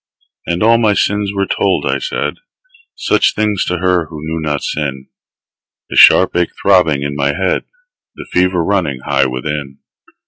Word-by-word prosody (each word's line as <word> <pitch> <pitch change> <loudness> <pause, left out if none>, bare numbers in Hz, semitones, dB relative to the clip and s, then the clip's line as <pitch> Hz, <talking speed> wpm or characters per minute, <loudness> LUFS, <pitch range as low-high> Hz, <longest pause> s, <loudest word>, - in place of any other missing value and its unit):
And 85 +4 -1
all 115 +1 +4
my 110 -3 +3
sins 105 +1 0
were 100 -1 -1
told; - - 0
I - - 0
said - - -3 0.6
Such - - +1
things 105 -3 0
to 90 - -2
her 90 -2 0
who 75 -1 -9
knew 80 +1 -3
not 75 -2 -2
sin 70 -3 -4 0.8
The - - -4
sharp - - +6
ache 90 -1 +1
throbbing 85 -8 +3
in 70 0 -3
my 70 0 0
head, 95 +2 -1 0.5
The - - -9
fever 90 -1 +2
running 80 -9 -1
high 65 - +2
within. 70 +2 -5
85 Hz, 165 wpm, -15 LUFS, 70-95 Hz, 0.8 s, sharp